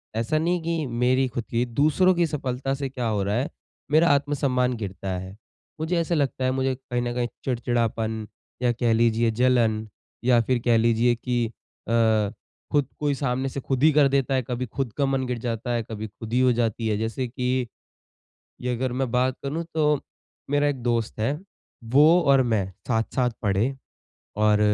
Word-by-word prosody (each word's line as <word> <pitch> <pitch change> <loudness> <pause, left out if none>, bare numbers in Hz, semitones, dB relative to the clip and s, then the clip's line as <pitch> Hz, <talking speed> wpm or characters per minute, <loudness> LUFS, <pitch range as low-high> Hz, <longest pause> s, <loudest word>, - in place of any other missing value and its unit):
ऐसा 115 +7 0
नहीं 170 +2 +1
कि 165 -2 -1
मेरी 125 +2 +2
खुद 120 -1 -4
की 120 +1 +1
दूसरों 155 +9 +3
की 175 0 +3
सफलता 135 -3 -2
से 135 -1 -3
क्या 125 -3 -3
हो 105 -3 0
रहा 100 +1 0
है, 130 +5 0 0.4
मेरा 160 +3 +5
आत्मसम्मान 135 -3 +1
गिरता 100 -2 -5
है। 95 +1 -8 0.4
मुझे 160 +3 0
ऐसा 170 +1 0
लगता 140 -3 0
है 130 - +2
मुझे 130 0 0
कहीं 125 -1 -3
न 120 0 -2
कहीं 120 -1 0 0.2
चिड़चिड़ापन 115 -3 -1 0.3
या 125 -1 +3
कह 120 -1 +1
लीजिए 115 0 +3
जलन 115 -2 +2 0.4
या 120 -1 +5
फिर 125 +2 0
कह 120 -2 +4
लीजिए 115 +1 +3
की 120 0 -1
अ, 110 -2 0 0.4
खुद 145 -4 +2
कोई 145 -1 +1
सामने 130 -1 -1
से 140 - -5
खुद 135 +1 -2
ही 155 - +7
कर 145 -1 +5
देता 135 -1 +1
है 130 - +2
कभी 125 0 -2
खुद 130 0 -3
का 140 - +2
मन 135 -1 0
गिर 125 -1 -2
जाता 115 0 -3
है, 120 -1 0
कभी 110 -1 -6
खुद 110 +2 -9
ही 125 - +3
हो 130 0 +5
जाती 115 -1 -1
है 105 -1 +1
जैसे 115 +4 -2
कि, 125 0 -1 0.9
ये 125 0 -1
अगर 130 +1 -2
मैं 130 0 -1
बात 125 +1 +1
करूँ 150 +5 -2
तो 150 -2 +2 0.5
मेरा 145 0 +3
एक 140 -3 -2
दोस्त 115 -3 -1
है 140 +8 0 0.5
वो 155 +6 +7
और 140 -4 +5
मैं 110 -6 0 0.2
साथ-साथ 125 +2 0
पढ़े 105 +6 +1 0.6
और 105 0 +3
125 Hz, 185 wpm, -25 LUFS, 115-135 Hz, 0.9 s, ही